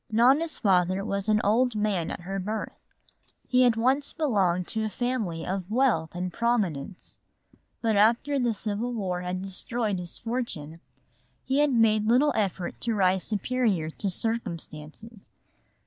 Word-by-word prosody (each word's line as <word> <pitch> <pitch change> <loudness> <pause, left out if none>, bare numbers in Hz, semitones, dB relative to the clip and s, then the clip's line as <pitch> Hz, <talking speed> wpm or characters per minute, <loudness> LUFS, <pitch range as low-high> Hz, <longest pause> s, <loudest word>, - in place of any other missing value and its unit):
Nona's 270 +9 +4
father 185 -1 +2
was 200 0 -2
an 215 0 +4
old 235 +3 +2
man 210 -5 0
at - - -6
her 195 +3 -4
birth. 210 +3 -4 0.7
He 250 0 +3
had 245 -3 +5
once 260 +5 +1
belonged 195 - +1
to 220 -1 -1
a 215 - -1
family 220 -9 -2
of 190 0 -3
wealth 220 -10 +1
and 180 0 -3
prominence. 200 -9 -1 0.6
But 225 -2 +2
after 235 +7 +3
the 240 -3 +1
civil 215 +4 -3
war 185 -5 -2
had 180 +1 -3
destroyed 205 +1 -2
his 175 -1 -7
fortune 225 -10 -4 0.7
he 265 +2 +1
had 295 -1 +3
made 215 -3 +3
little 260 +6 +4
effort 190 -4 -2
to 230 -2 0
rise 190 -2 +2
superior 210 -6 0
to 200 - -3
circumstances. 195 -1 -4
215 Hz, 145 wpm, -27 LUFS, 185-240 Hz, 0.7 s, had